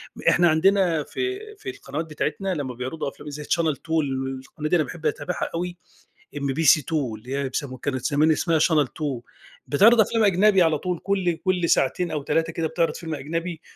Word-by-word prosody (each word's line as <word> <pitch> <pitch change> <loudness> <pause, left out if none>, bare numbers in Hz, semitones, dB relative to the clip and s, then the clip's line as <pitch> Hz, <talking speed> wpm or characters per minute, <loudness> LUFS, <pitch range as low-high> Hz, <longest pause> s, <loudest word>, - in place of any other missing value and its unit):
م - - -10
إحنا 175 0 +4
عندنا 170 -1 +3
في 385 - -3 0.2
في 400 -2 -7
القنوات 155 - -5
بتاعتنا، 160 +5 -2
لمّا 135 -5 -4
بيعرَضوا 130 +4 -4
أفلام 145 +2 -11
زي 150 +1 -7
Channel 160 -1 +1
Two 160 - -21
ال 135 -1 -3
القناة 150 +3 -6
دي - - +3
أنا 165 - +3
باحب 160 +1 -9
أتابعها 165 +3 -2
أوي، 175 +1 -3 0.6
MBC2 145 +1 +2
اللي 125 -4 -3
هي 140 -1 -1
أب 130 - -8
سمو 130 -4 -3
كانت 130 -1 -3
زمان 150 +3 +3
اسمها 160 +1 +2
Channel 155 -2 +3
Two، 140 -6 -4 0.5
بتعرض 220 +11 +6
أفلام 220 +1 +2
أجنبي 195 0 +5
على 160 -2 +2
طول، 180 -2 -3
كل 185 -4 0
كل 180 -3 +1
ساعتين 170 +6 +2
أو 150 - -2
3 165 +3 0
كده 165 0 -2
بتعرض 165 +1 0
فيلم 160 -2 -5
أجنبي، 165 +3 -4
160 Hz, 190 wpm, -24 LUFS, 145-180 Hz, 0.6 s, بتعرض